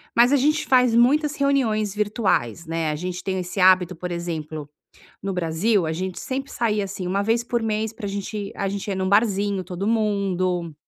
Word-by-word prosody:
Mas 240 +3 +5
a - - +5
gente 300 +3 +2
faz 250 -3 +4
muitas 290 +5 +3
reuniões 230 -8 +1
virtuais, 200 - 0
né, 165 -1 -1
a - - -2
gente 180 +3 -5
tem 190 -1 -2
esse 180 +2 -5
hábito, 185 -1 +5
por 180 +2 -5
exemplo, 155 -3 -5 0.5
no 195 - -2
Brasil 180 +3 +1
a 160 - -1
gente 185 +2 -4
sempre 270 +1 -4
saía, 210 -3 0
assim, 190 -1 -5
uma 195 +2 0
vez 225 +3 +1
por 240 -2 -1
mês 220 0 -1
pra 210 -2 -7
a - - -2
gente 200 +1 -4
a 195 - -1
gente 200 +1 -4
ir - - -1
num 190 0 -1
barzinho, 200 -2 +2
todo 180 +2 -4
mundo. 185 -6 0
200 Hz, 200 wpm, -23 LUFS, 180-225 Hz, 0.5 s, Mas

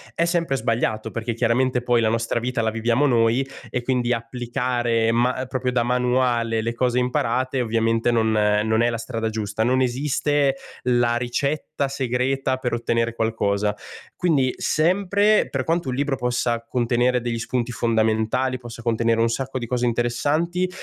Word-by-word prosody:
è 170 - +2
sempre 170 -4 0
sbagliato, 115 -3 -1
perché 115 0 -3
chiaramente 125 +2 +1
poi 120 -1 +2
la 110 - +2
nostra 115 +1 0
vita 120 0 -2
la 110 - +1
viviamo 115 +5 +1
noi 120 0 +2 0.2
e 125 - -3
quindi 125 -1 0
applicare 120 -1 -1
ma 125 +2 +1
proprio 130 0 -2
da 125 -1 +1
manuale 125 -2 +1
le 115 +1 -2
cose 125 +1 0
imparate 125 +1 0
ovviamente 115 0 +1
non 110 -1 +2
non 105 +1 +2
è 120 - +3
la 115 - -2
strada 115 -1 -3
giusta. 110 -1 -3
Non 130 +3 +2
esiste 140 +2 +1 0.3
la 120 -1 +2
ricetta 140 +4 -2
segreta 130 0 -1
per 125 -2 -3
ottenere 115 0 0
qualcosa, 105 -2 0 0.4
quindi 145 -8 +2 0.3
sempre 200 +5 +3
per 130 -2 -2
quanto 165 -3 0
un 125 - -2
libro 140 +1 0
possa 120 -2 -1
contenere 125 +1 +1
degli 120 -1 -3
spunti 120 +1 -2
fondamentali, 115 +3 +1
possa 120 -1 -10
contenere 115 0 +1
un 115 - +3
sacco 130 +3 -3
di 120 - -4
cose 125 +1 0
interessanti, 145 +10 0
120 Hz, 160 wpm, -23 LUFS, 115-130 Hz, 0.4 s, è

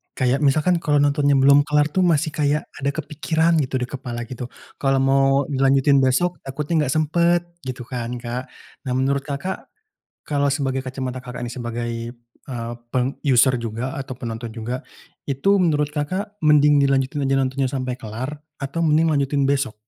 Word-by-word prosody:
Kayak 130 +1 +1
misalkan 155 +5 +3
kalau 150 -1 +2
nontonnya 145 0 +3
belum 140 +2 +6
kelar 150 0 +2
tuh 185 - +1
masih 160 -3 +2
kayak 150 0 +1 0.2
ada 140 +1 0
kepikiran 160 +2 +1
gitu, 130 -1 -3
di 125 - -1
kepala 125 -2 -6
gitu, 125 +1 -6 0.3
kalau 135 -1 +2
mau 135 0 +4 0.2
dilanjutin 135 0 +3
besok 140 +6 +1
takutnya 150 +3 -1
nggak 130 - 0
sempet 170 +3 +2 0.2
gitu 130 -2 -6
kan 125 -1 -4
Kak. 120 +1 -5 0.4
Nah 125 - 0
menurut 135 +1 +1
Kakak, 145 +7 -4 0.6
kalau 145 -1 0
sebagai 135 -2 -1
kacamata 130 -1 -4
Kakak, 125 -1 -7
ini 120 - -4
sebagai, 120 -1 -4 0.6
eee, 120 -3 -5 0.2
peng 130 +1 0
user 130 0 +5
juga 120 +3 -4
atau 135 -1 -5
penonton 115 -2 -6
juga, 120 +3 -4 0.4
itu 150 +9 +2
menurut 150 -5 +2
Kakak, 185 +8 -3
mending 150 -1 +6
dilanjutin 135 +1 +1
aja 135 0 +1
nontonnya 135 +1 0
sampai 130 -2 -2
kelar 120 +7 -5 0.2
atau 145 +4 -2
mending 160 +1 +3
lanjutin 140 -1 +1
besok? 140 -5 0
135 Hz, 165 wpm, -22 LUFS, 130-150 Hz, 0.6 s, belum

